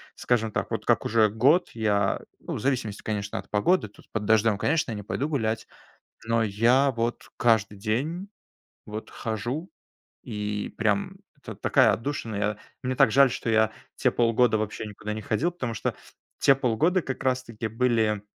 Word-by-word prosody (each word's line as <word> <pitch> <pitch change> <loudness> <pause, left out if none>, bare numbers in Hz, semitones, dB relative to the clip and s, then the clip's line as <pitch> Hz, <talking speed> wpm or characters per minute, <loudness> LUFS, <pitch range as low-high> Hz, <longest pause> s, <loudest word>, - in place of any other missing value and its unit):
скажем 115 -3 0
так, - - -2
вот - - -3
как - - +3
уже 110 -1 +4
год 135 - +3
я, 105 -3 +1 0.2
ну, - - -5
в - - -3
зависимости, 125 -5 -1
конечно, 105 -1 -3
от - - -11
погоды, 110 - +2
тут 105 - -19
под 110 -1 -2
дождём, 110 -1 +3
конечно, 155 -6 +1
я - - -3
не 105 - -6
пойду 140 +8 -2
гулять, 110 -6 -1 0.6
но 115 0 +2
я 120 +7 +3
вот 115 0 -2
каждый 110 -4 +2
день 150 - -2 0.6
вот 110 +1 -7
хожу, 120 - -4 0.5
и 105 0 -4
прям 105 -2 0 0.3
это - - -8
такая - - +4
отдушина. 115 -2 -3
Я 105 +1 -1 0.3
мне 130 0 0
так 110 - +5
жаль, 135 0 +6
что 115 - -2
я 110 -1 +3 0.2
те - - +2
полгода 115 -1 +3
вообще 110 0 -3
никуда 105 +1 -6
не 110 - -5
ходил, 135 - 0
потому 125 -9 -4
что - - -2 0.4
те 135 - +6
полгода 135 +8 +1
как 130 -2 -5
раз 130 -1 +1
таки 115 -1 -5
были 110 -3 +1
115 Hz, 175 wpm, -26 LUFS, 105-130 Hz, 0.6 s, жаль